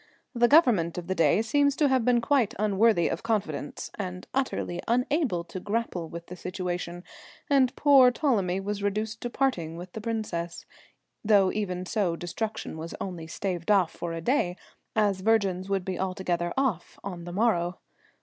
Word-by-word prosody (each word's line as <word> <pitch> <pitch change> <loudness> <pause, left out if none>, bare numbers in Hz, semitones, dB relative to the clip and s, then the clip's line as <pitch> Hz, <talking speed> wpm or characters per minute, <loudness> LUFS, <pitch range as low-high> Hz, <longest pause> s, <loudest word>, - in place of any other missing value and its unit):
The 240 -1 +4
government 235 - +4
of 175 - -4
the 190 - -1
day 165 +4 +3
seems 285 +4 +2
to 295 - +3
have 260 -3 +2
been 240 0 +3
quite 245 -4 +2
unworthy 210 -2 +3
of 165 - -3
confidence 190 -11 -3
and 185 -1 -5
utterly 255 -9 -1
unable 250 - +1
to 185 - -7
grapple 200 -5 -2
with 170 0 -8
the 180 - -9
situation, 180 -1 -4 0.5
and 265 -2 +4
poor 275 -3 +7
Ptolemy 215 - +1
was 205 +1 -3
reduced 215 +3 -2
to 240 - -3
parting 175 - -1
with 175 +1 -9
the 220 - -6
Princess, 205 -7 -3 0.6
though 205 -3 +4
even 185 -4 -3
so 185 -4 0
destruction 210 +1 -4
was 165 +1 -6
only 175 -4 -5
staved 175 +1 -4
off 195 -5 +4
for 175 - -5
a 165 - -4
day, 180 - +1 0.4
as 205 -3 +2
virgins 195 -3 +1
would 195 -2 0
be 185 -1 -3
altogether 180 -2 -1
"off" 255 -11 -1
on 180 -3 -6
the 175 - -6
morrow. 175 -4 +1
195 Hz, 170 wpm, -27 LUFS, 175-230 Hz, 0.6 s, poor